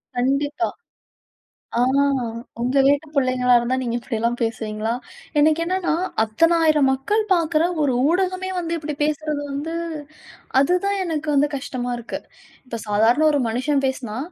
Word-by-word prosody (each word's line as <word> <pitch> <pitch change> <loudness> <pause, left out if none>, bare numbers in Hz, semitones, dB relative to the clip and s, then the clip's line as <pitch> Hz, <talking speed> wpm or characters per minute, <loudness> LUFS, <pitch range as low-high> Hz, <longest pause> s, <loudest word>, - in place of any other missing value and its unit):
கண்டிப்பா! 280 +6 0 1.1
ஆ - - +3 0.8
உங்க 255 +3 +1
வீட்டு 285 +3 +3
பிள்ளைங்களா 255 -2 +3
இருந்தா 240 +2 -1
நீங்க 235 -2 -2
இப்டிலாம் 235 0 -2
பேசுவீங்களா? 220 -1 -2 0.5
எனக்கு 310 +2 +4
என்னன்னா, 365 0 0 0.3
அத்தனை 330 +11 +3
ஆயிரம் 305 -4 +4
மக்கள் 270 +12 +1
பார்க்குற 330 -2 +2 0.2
ஒரு 280 -3 +2 0.2
ஊடகமே 370 +2 0
வந்து 335 -2 -2
இப்படி 300 -1 -4
பேசுறது 300 -1 -1
வந்து, 295 +4 -4 0.9
அதுதான் 360 +7 +2
எனக்கு 315 -3 -3
வந்து 285 +1 +4
கஷ்டமா 255 -2 -4
இருக்கு. 235 - -6 0.5
இப்ப 235 -3 -6
சாதாரண 225 +8 +3
ஒரு 290 - +1
மனுஷன் 270 +5 0
பேசுனா, 250 -4 -3
280 Hz, 130 wpm, -22 LUFS, 245-315 Hz, 1.1 s, எனக்கு